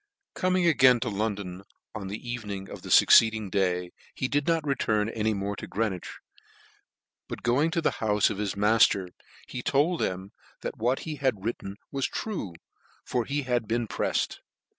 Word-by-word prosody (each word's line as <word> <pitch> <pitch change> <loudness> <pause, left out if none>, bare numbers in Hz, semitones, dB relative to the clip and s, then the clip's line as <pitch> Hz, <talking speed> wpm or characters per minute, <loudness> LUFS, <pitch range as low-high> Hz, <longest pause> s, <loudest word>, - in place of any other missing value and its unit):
Coming 185 -1 +1
again 130 -7 +6
to - - -1
London 100 -3 -3 0.3
on 100 -2 -5
the 100 +2 -4
evening 105 -5 -5
of - - -8
the - - -9
fucceeding 110 -3 +6
cfay, 90 -2 0 0.2
he 130 - -1
did 145 +1 0
not 165 -2 +1
return 110 -6 +1
any 110 -1 0
more 100 +1 -3
to - - -7
Greenwich, 100 -5 -3 1.1
but - - -7
going 130 +7 +3
to 170 0 -1
the - - +2
houfe 105 -1 +3
of 100 - -5
his 105 -2 -2
maf 105 +3 +5
ters, 95 -3 -3 0.4
he 125 - -5
told 150 +7 +2
them 95 +2 -2 0.3
that - - -5
what 125 +4 +1
he 155 -2 -5
had 125 -8 -1
written 100 -4 -4 0.2
was 135 -1 0
true, 175 - -4 0.5
for 120 -2 -1
that - - -11
he 145 0 0
had 120 -3 -1
been 115 +1 0
preffed. - - -1
110 Hz, 180 wpm, -27 LUFS, 100-135 Hz, 1.1 s, again